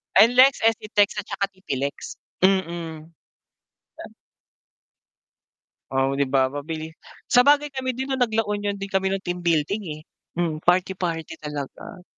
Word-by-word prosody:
NLEX, 250 Hz, +4 st, +6 dB
SCTEX 215 Hz, -2 st, +2 dB
at 205 Hz, -, -7 dB
saka 200 Hz, -, -1 dB
TPLEX, 140 Hz, -7 st, -4 dB, 0.3 s
mm. 170 Hz, -4 st, 0 dB, 2.8 s
Oh, 135 Hz, +1 st, +1 dB
di 140 Hz, -, +2 dB
ba 130 Hz, -1 st, +2 dB
mabilis. 155 Hz, +2 st, -5 dB, 0.4 s
Sabagay 285 Hz, +4 st, +5 dB
kami 260 Hz, -2 st, -3 dB
din 265 Hz, +1 st, -4 dB
nung 265 Hz, -, -1 dB
nag-La 225 Hz, -2 st, +2 dB
Union 205 Hz, -1 st, -2 dB
din 195 Hz, 0 st, -7 dB
kami 190 Hz, 0 st, +1 dB
nung 195 Hz, 0 st, -2 dB
team 175 Hz, 0 st, -3 dB
building, 170 Hz, +4 st, 0 dB
eh. 155 Hz, -, -12 dB, 0.3 s
Mm, 165 Hz, -3 st, -1 dB
party-party 175 Hz, -2 st, 0 dB
talaga. 150 Hz, +5 st, -7 dB
190 Hz, 125 wpm, -24 LUFS, 155-215 Hz, 2.8 s, NLEX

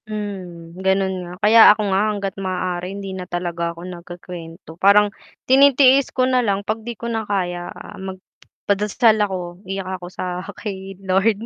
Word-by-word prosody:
Hmm, 185 Hz, -6 st, -6 dB
ganun 190 Hz, 0 st, +2 dB
nga. 175 Hz, -1 st, -8 dB
Kaya 225 Hz, +2 st, +7 dB
ako 215 Hz, -, +1 dB
nga 190 Hz, -, +3 dB
hangga't 200 Hz, -2 st, -3 dB
maaari 180 Hz, -1 st, -2 dB
hindi 195 Hz, -1 st, -6 dB
na 185 Hz, -1 st, -7 dB
talaga 175 Hz, -1 st, -2 dB
ako 170 Hz, +1 st, -8 dB
nagkuwe-kuwento. 175 Hz, -2 st, -9 dB
Parang 205 Hz, +1 st, +5 dB, 0.3 s
tinitiis 270 Hz, 0 st, +5 dB
ko 255 Hz, -, +1 dB
na 255 Hz, -1 st, +2 dB
lang, 200 Hz, -3 st, -1 dB
pag 220 Hz, +1 st, -2 dB
'di 235 Hz, 0 st, -7 dB
ko 235 Hz, -, -8 dB
na 230 Hz, -1 st, -1 dB
kaya, 175 Hz, -3 st, -2 dB
ah, -, -, -10 dB
magdadasal 205 Hz, +3 st, -1 dB
ako, 180 Hz, -3 st, -3 dB
iyak 195 Hz, 0 st, -3 dB, 0.2 s
ako 175 Hz, -, -7 dB
sa 180 Hz, 0 st, -4 dB, 0.2 s
kay 195 Hz, -2 st, -6 dB
Lord, 200 Hz, +4 st, +1 dB
195 Hz, 160 wpm, -21 LUFS, 180-210 Hz, 0.3 s, Kaya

